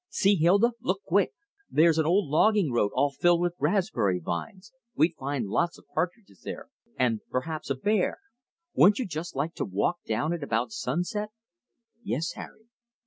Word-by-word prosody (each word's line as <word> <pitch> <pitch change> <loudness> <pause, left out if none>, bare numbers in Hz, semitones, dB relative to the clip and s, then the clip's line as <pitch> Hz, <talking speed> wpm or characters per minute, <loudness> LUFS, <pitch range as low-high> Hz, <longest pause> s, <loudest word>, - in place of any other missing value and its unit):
See, 200 +1 +3
Hilda, 195 +8 +4
look 195 +2 -1
quick! 195 +3 +2 0.4
There's 160 0 +4
an 155 - +2
old 190 +2 +3
logging 180 +2 +3
road 115 -4 +2
all 140 +2 +2
filled 175 +5 +3
with 175 0 0
raspberry 155 - +1
vines. 90 - -6 0.2
We'd 165 +3 +3
find 135 -3 -3
lots 170 - 0
of - - -19
partridges 180 - -3
there, - - -7 0.3
and 120 -4 +1
perhaps 155 +5 -3
a 140 - +1
bear. 205 +8 0 0.6
Wouldn't 200 +3 +6
you 255 - -1
just 165 -2 -6
like 150 +5 -2
to - - -3
walk 100 - 0
down 155 +3 0
it 170 - -4
about 115 -3 -1
sunset?" 180 - -2 0.7
"Yes, 165 -8 -2
Harry." 220 - -11
165 Hz, 165 wpm, -27 LUFS, 135-190 Hz, 0.7 s, Wouldn't